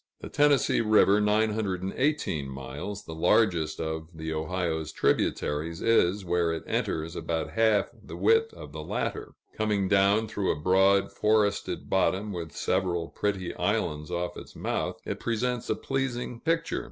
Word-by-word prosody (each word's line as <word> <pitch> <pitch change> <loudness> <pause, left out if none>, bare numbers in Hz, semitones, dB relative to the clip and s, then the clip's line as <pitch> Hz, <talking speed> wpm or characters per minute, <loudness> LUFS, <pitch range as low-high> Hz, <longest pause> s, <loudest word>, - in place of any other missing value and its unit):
The - - -7
Tennessee 145 -5 +3
River 105 -2 +4
(918 105 - 0
miles), 70 +10 -6
the 80 - -7
largest 80 -2 +2
of 80 0 -4
the 80 0 -4
Ohio's 80 -1 -2
tributaries, 80 +2 0
is, 100 -4 +2
where 85 -1 +1
it 80 - -4
enters, 80 +2 -2
about 80 -2 -2
half 110 -2 +2
the - - -9
width 450 0 +3
of - - -10
the - - -6
latter. - - -4 0.2
Coming 105 -3 0
down 100 +3 +3
through 105 -3 -2
a 75 - -3
broad, 95 +3 +3
forested 105 -1 +1
bottom, 95 +2 +1
with 85 -3 -5
several 90 -3 -1
pretty 95 -3 -2
islands 75 0 -1
off 90 0 -3
its - - -11
mouth, - - -2
it - - -4
presents 120 +1 -2
a - - +2
pleasing 125 -3 -3
picture. 165 +3 0
95 Hz, 145 wpm, -28 LUFS, 80-110 Hz, 0.2 s, River